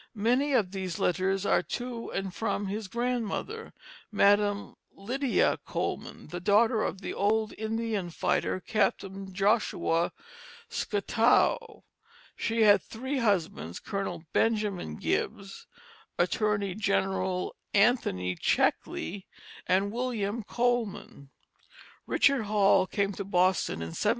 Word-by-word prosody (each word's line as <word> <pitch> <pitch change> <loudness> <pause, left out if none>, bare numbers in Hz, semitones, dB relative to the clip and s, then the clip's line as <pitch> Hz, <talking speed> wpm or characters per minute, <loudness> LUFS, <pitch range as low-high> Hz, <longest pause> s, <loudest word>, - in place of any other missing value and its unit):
Many 250 +7 +2
of 210 -8 +2
these 185 -3 -4
letters 190 +2 0
are - - +3
to 240 -1 -5
and 195 -1 -3
from 205 -1 -2
his 205 +1 -4
grandmother, 245 - -3 0.4
Madam 205 0 +3 0.2
Lydia 250 +6 0
Coleman, - - -4
the 175 - -5
daughter 215 +5 +3
of 190 - -2
the - - -4
old 215 +2 +1
Indian 220 -3 -2
fighter, 170 - 0
Captain 195 -1 -1
Joshua 195 -4 +1 0.6
Scottow. 225 +3 +1 0.5
She 225 0 +1
had 205 -1 +6
three 260 +5 -4
husbands, 170 - 0
Colonel 195 -4 -4
Benjamin 210 - 0
Gibbs, 195 - -3 0.5
Attorney 205 -3 +1
General 190 -2 -1 0.2
Anthony 200 - +2
Checkley, 190 - 0 0.4
and 195 +2 +2
William 230 -2 -2
Coleman. 235 - -2 0.8
Richard 275 -6 +3
Hall 200 -2 +4
came 200 0 0
to 200 - -5
Boston 185 - +1
in 80 - -5
1718. 145 - -1
205 Hz, 110 wpm, -29 LUFS, 190-225 Hz, 0.8 s, had